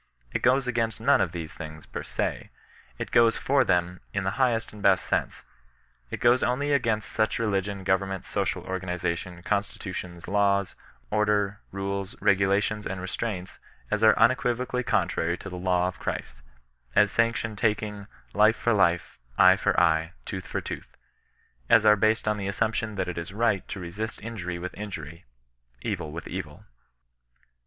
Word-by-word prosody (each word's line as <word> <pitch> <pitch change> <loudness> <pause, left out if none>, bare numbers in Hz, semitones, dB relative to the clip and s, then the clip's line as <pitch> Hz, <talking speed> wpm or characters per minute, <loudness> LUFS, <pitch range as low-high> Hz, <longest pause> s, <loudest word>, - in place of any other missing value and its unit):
It - - 0
goes 130 +1 +3
against 115 -3 0
none - - +4
of - - 0
these 80 -2 -6
things, 80 -1 -9
per - - -6
se. - - -3 0.5
It - - -5
goes 115 -1 +5
for 135 0 +3
them, 90 -2 +1 0.2
in 100 - 0
the 95 - 0
highest 115 -4 +1
and 105 - -10
best 100 -2 +4
sense. - - -1 0.7
It - - -5
goes 120 +2 +4
only 140 +4 0
against 115 -6 0
siich 110 0 +1
religion, 100 -3 -1
government, 95 0 0
social - - -2
organization, 90 -1 -3
constitutions, 90 -3 -3
laws, 100 -1 +2 0.4
order, 105 -1 +1
rules, 100 0 -4
regulations 100 +2 +2
and 95 0 -4
restraints, 95 0 -4 0.3
as 105 0 +1
are 110 -1 +6
un 115 +3 +7
equivocally 125 -1 -1
contrary 85 -7 0
to 100 - -9
the - - -5
law 90 -1 +2
of 95 - -6
Christ; - - -5 0.5
as 105 -1 +5
sanction 115 -1 +1
taking 105 -1 -1
" - - -32
life 110 +1 +5
for 120 - +1
life, 85 - +1 0.2
eye - - +8
for - - +1
eye, 80 -1 +2
tooth 95 -1 -5
for - - -2
tooth - - -8 0.4
;" - - -37
as 110 -1 +4
are 105 0 +8
based 110 +1 +2
on 105 0 +2
the 100 -1 -3
assumption, 110 +1 -1
that 95 - -1
it 90 -1 -3
is 85 +3 -7
right 110 -3 +1
to 95 - -6
resist 100 +6 -5
injury 95 -6 -4
with 90 +1 -5
injury, 85 -7 -7 0.6
evU 75 - -2
with 85 +2 -7
evU. - - -9
eHKEBTiAir 95 -1 -3
Noir 75 0 -15
BssiBtAiroE. - - -28
100 Hz, 175 wpm, -27 LUFS, 90-110 Hz, 0.7 s, eye